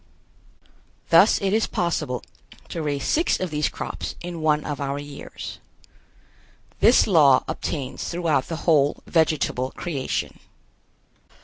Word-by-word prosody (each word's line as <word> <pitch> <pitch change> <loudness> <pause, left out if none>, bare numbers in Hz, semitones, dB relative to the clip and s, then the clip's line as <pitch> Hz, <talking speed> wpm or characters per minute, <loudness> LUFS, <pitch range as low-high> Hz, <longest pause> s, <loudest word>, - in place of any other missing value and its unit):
Thus - - +6
it 195 0 +1
is 220 +1 +2
possible 150 -8 -2 0.5
to 165 - -4
raise 145 -3 -2
six 330 +3 +1
of 185 -3 -3
these 150 0 0
crops - - -6
in 175 -2 -6
one 150 -1 +2
of 145 -1 -4
our 140 0 -2
years. 145 0 -8 1.2
This 240 - +6
law 150 -9 +5
obtains 140 -5 -4
throughout 165 -6 0
the 165 - -4
whole 145 -4 +3
vegetable 155 -5 +1
creation. 140 -2 -4
150 Hz, 120 wpm, -23 LUFS, 140-170 Hz, 1.2 s, Thus